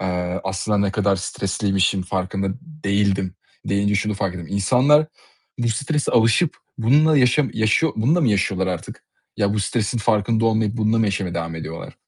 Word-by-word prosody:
eee, 90 0 -2
"Aslında 95 +2 -1
ne 100 -1 +1
kadar 100 -2 +1
stresliymişim, 95 0 -1
farkında 95 +1 -2
değildim." 100 - -1 0.3
deyince 100 +1 +1
şunu 105 +1 0
fark 95 -2 -2
ettim. 85 -3 -7
İnsanlar 125 +10 +3 0.5
bu 120 -1 0
strese 140 +6 -1
alışıp 115 +9 +3 0.2
bununla 145 +6 +4
yaşam 130 +3 +3
yaşıyor 110 +9 +2
bununla 140 +11 +2
mı 140 - +2
yaşıyorlar 95 -2 0
artık? 90 -3 -6 0.3
Ya 100 0 +1
bu 105 - 0
stresin 110 +3 -1
farkında 110 +1 +1
olmayıp 110 -1 +1
bununla 110 0 +1
mı 115 - +3
yaşamaya 95 -3 -2
devam 85 -1 -4
ediyorlar? 80 0 -7
105 Hz, 160 wpm, -21 LUFS, 95-115 Hz, 0.5 s, bununla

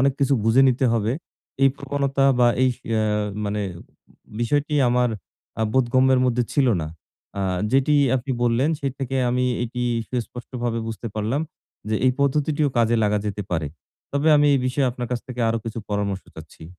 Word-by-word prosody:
অনেক 135 +1 +3
কিছু 140 0 +3
বুঝে 115 +4 +5
নিতে 130 +1 +1
হবে। 115 0 +1 0.5
এই 135 - +7
প্রবণতা 140 -1 -1
বা 120 -1 +5
এইস 130 -2 +2
অ্যা 110 -1 +1 0.4
মানে 105 0 -2 0.2
উম - - -13 0.6
বিষয়টি 145 +5 0
আমার 125 0 +2 0.5
আ - - +2
বোধগম্যের 130 +1 +3
মধ্যে 125 0 +1
ছিল 140 -3 +3 0.2
না। 75 - -4 0.5
আ 100 - -1 0.3
যেটি 135 +2 +3 0.2
আপনি 130 +2 -5
বললেন, 120 +5 +2
সেই 135 -2 -2
থেকে 135 0 -3
আমি 125 +1 +1 0.2
এটি 125 +1 -4 0.3
সুস্পষ্টভাবে 120 -1 -4
বুঝতে 115 +1 -6
পারলাম 110 +6 -1 0.5
যে, 110 - 0
এই 125 - +4
পদ্ধতিটিও 145 +1 +1
কাজে 115 0 +3
লাগা 105 0 +2
যেতে 105 0 -3
পারে। 80 -4 -1 0.5
তবে 140 +3 +1
আমি 145 - +4
এই - - +3
বিষয়ে 130 +1 +1
আপনার 125 0 -5
কাছ 120 - -1
থেকে 125 -1 -5
আরো 115 - 0
কিছু 115 0 -5
পরামর্শ 100 -2 -2
চাচ্ছি। 80 0 -12
125 Hz, 170 wpm, -23 LUFS, 115-135 Hz, 0.6 s, এই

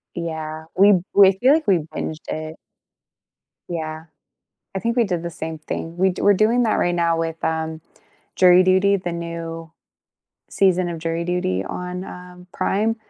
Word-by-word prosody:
Yeah, 160 -2 -5
we 200 +2 +6 0.2
we 195 -1 +7
feel 265 +4 +5
like 315 0 0
we 190 - +5 0.2
binged 160 0 -5
it. 155 0 -5 1.1
Yeah, 160 -2 -5 0.7
I - - 0
think 235 +3 -1
we 240 - +4
did 175 -4 -2
the 170 - -3
same 160 0 -6
thing, 165 +2 -6
we 190 +1 +3
do 180 - -6
we're 205 - +6
doing 225 +5 +3
that 220 - +1
right 175 0 +1
now 170 -1 +1
with, 165 0 -4
um, 160 0 -2 0.6
Jury 180 0 +7
Duty, 190 +2 +3
the 180 -2 -4
new 165 -1 -6 0.8
season 185 -2 +2
of 170 - -5
Jury 165 +1 -2
Duty 135 - -1
on, 180 - -5
um, 180 -1 -11
Prime, 220 +3 0
175 Hz, 165 wpm, -21 LUFS, 165-190 Hz, 1.1 s, we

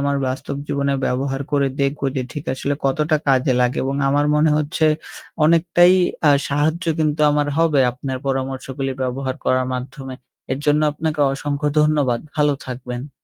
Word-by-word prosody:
আমার 140 0 0
বাস্তব 130 +2 -4
জীবনে 140 -1 0
ব্যবহার 135 +2 -2
করে 140 -1 +2
দেখব 140 +1 0 0.2
যে 130 - 0
ঠিক 150 - -6
আসলে 140 +2 -2
কতটা 150 +3 +2
কাজে 130 0 +3
লাগে 125 0 +1
এবং 135 +1 -2
আমার 145 +1 +2
মনে 150 +1 +3
হচ্ছে 155 +1 0 0.6
অনেকটাই 175 +2 +5 0.4
আ - - +7 0.2
সাহায্য 155 +5 0
কিন্তু 155 -1 0
আমার 145 0 +1
হবে 155 -4 +3
আপনার 130 +1 -5
পরামর্শগুলি 135 0 -3
ব্যবহার 130 +1 -2
করার 130 0 +1
মাধ্যমে। 130 +1 -6 0.4
এর 130 - -2
জন্য 150 +1 +3
আপনাকে 155 0 -3
অসংখ্য 145 +1 -2
ধন্যবাদ। 145 -6 +2 0.2
ভালো 150 -1 +3
থাকবেন। 125 +2 -6
140 Hz, 155 wpm, -20 LUFS, 130-150 Hz, 0.6 s, আ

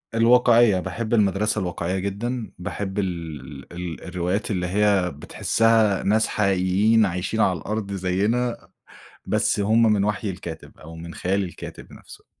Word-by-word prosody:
الواقعية 115 -3 +5
باحب 115 +5 -4
المدرسة 105 0 +2
الواقعية 90 +1 -2
جدًا، 110 +5 -4
باحب 95 +2 -4
ال 100 - +1 0.4
ال 70 +4 -11
ال 85 -2 -6
الروايات 90 +4 -2
اللي 90 -3 -1
هي 100 -1 +2
بتحِسّها 110 +7 +1
ناس 110 +2 +2
حقيقيين 100 +3 +2
عايشين 90 +4 -2
على 95 -3 +2
الأرض 105 -1 -4
زيّنا، 105 +6 -1 0.6
بس - - +1
هُم 110 +3 +3
من 100 -2 +2
وحي 105 0 -1
الكاتب، 85 -3 -9
أو 80 +1 -11
من 85 +1 -9
خيال 100 +2 0
الكاتب 90 - -9
نَفْسُه. - - -14
100 Hz, 140 wpm, -23 LUFS, 90-110 Hz, 0.6 s, الواقعية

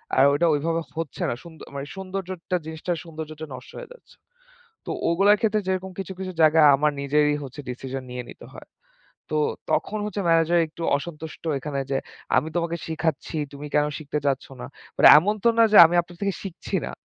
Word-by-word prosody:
আর 130 - +5
ওইটা 170 +4 +2
ওইভাবে 165 +3 0 0.2
হচ্ছে 160 -6 -5
না। - - 0
সুন্দ 160 -2 -13
মানে 140 0 -5
সৌন্দর্যটা 185 -2 -4
জিনিসটার 160 +2 -3
সৌন্দর্যটা 155 -1 -8
নষ্ট 125 0 -10
হয়ে - - -9
যাচ্ছে। - - -21 0.7
তো - - -4 0.2
ওগুলার 195 +5 +4
ক্ষেত্রে, 215 -1 +1
যেরকম 190 0 -2
কিছু, 190 0 -5
কিছু 185 -1 -4
জায়গায়, 155 0 +6
আমার 150 +1 +1
নিজেরই 150 +1 +2
হচ্ছে 135 +2 -9
ডিসিশন 130 +1 -6
নিয়ে 125 0 -5
নিতে - - -12
হয়। - - -12 0.6
তো 155 - -2 0.4
তখন 215 - 0
হচ্ছে 205 -1 -3
ম্যানেজার 165 +1 +4
একটু 160 +2 -12 0.2
অসন্তুষ্ট 160 +1 -9 0.2
এখানে 140 0 -4
যে, 135 - +2 0.4
আমি 160 - +1
তোমাকে 170 0 -1
শিখাচ্ছি, 160 -1 -2 0.2
তুমি 145 +1 -8
কেনো 150 0 +2
শিখতে 150 0 -3
চাচ্ছ 135 -1 0 0.2
না? - - -5 0.3
আর - - +4
এমন 205 +7 +2
তো 235 - +6
না 230 - +7
যে 210 - +7
আমি 175 +2 +1
আপনার 175 0 -15
থেকে 200 -1 0
শিখছি 185 -3 -5
না। - - -6
160 Hz, 185 wpm, -24 LUFS, 150-185 Hz, 0.7 s, না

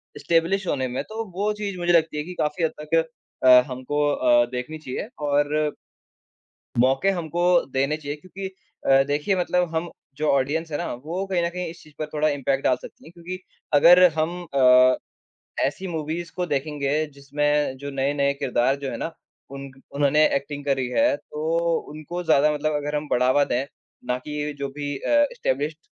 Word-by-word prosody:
Establish 170 +4 +1
होने 130 -2 0
में। 125 +1 -3
तो 225 +1 -4
वो 205 +2 0
चीज़ 205 -3 -4
मुझे 175 0 +2
लगती 160 -2 +3
है 150 - -1
कि 180 +2 -8
काफ़ी 150 +3 -1
हद 160 - +2
तक 165 +2 +1 0.4
अ, - - +4 0.2
हमको 130 +3 -4
अ, 120 -3 +4
देखनी 125 +5 -4
चाहिए, 155 +6 -5
और 145 +1 +1 1.1
मौके 135 +9 +3
हमको 170 0 -3 0.3
देने 135 +3 +1
चाहिए 145 -1 -5
क्योंकि 190 +4 -8 0.4
अ, 135 0 +6
देखिए 150 +7 0
मतलब 180 -2 0
हम 165 +1 -2 0.3
जो 155 0 -1
ऑडियंस 145 +4 0
हैं 145 - -2
ना, 175 - -3
वो 165 +10 -4
कहीं 185 -3 0
न - - +1
कहीं 180 0 -4
इस 170 - -13
चीज़ 155 -1 -18
पर 155 - -2
थोड़ा 155 +1 +2
इम्पैक्ट 140 -1 0
डाल 130 - +3
सकती - - -12
हैं। 160 - -12
क्योंकि 175 +2 -7 0.4
अगर 175 +5 +8
हम 165 +3 -1
अ, 130 -1 +6 0.7
ऐसी 190 - -5
मूवीज़ 165 +1 -4
को 180 -1 -1
देखेंगे 145 0 -1
जिसमें 145 0 0
जो 140 +1 -6
नए-नए 140 +1 +1
किरदार 130 -1 +1
जो 135 - -2
हैं - - -4
ना, 165 - -4 0.4
उन 140 0 -8 0.2
उन्होंने 145 +2 +4
ऐक्टिंग 140 +1 -3
करी 135 -3 0
हैं, 290 - +3
तो 165 +2 -1
उनको 155 +4 -6
ज़्यादा 150 -1 +4
मतलब 155 +1 -1
अगर 145 0 -2
हम 150 0 -2
बढ़ावा 130 +3 +4
दें, 125 +3 -1 0.4
ना 125 0 0
कि 150 +1 -4
जो 140 -1 -2
भी 145 -1 -3
अ, 290 - +3
इस्टैब्लिश्ड 145 +4 -2
150 Hz, 180 wpm, -24 LUFS, 140-170 Hz, 1.1 s, अगर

